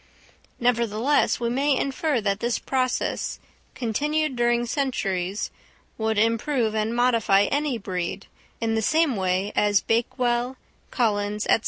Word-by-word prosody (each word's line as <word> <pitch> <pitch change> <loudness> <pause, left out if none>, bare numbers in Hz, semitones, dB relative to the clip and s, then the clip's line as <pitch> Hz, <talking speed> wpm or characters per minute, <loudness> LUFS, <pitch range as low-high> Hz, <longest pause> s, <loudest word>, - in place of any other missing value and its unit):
Nevertheless 235 +2 +2
we 235 -1 -1
may 275 +2 +2
infer 275 -1 0
that 200 -1 0
this 235 +1 0
process, 255 -2 -1 0.4
continued 295 +5 -1
during 240 0 +2
centuries, 205 -8 -2 0.4
would 220 -1 -1
improve 230 +2 +1
and 220 +1 -1
modify 230 -5 +3
any 285 +2 0
breed, 185 -2 -4 0.3
in 225 -1 0
the 220 - +1
same 310 +2 +2
way 190 +1 0
as 205 -1 +3
Bakewell, 240 +2 0 0.3
Collins, 210 -3 0
&c. - - +6
235 Hz, 125 wpm, -24 LUFS, 210-255 Hz, 0.4 s, c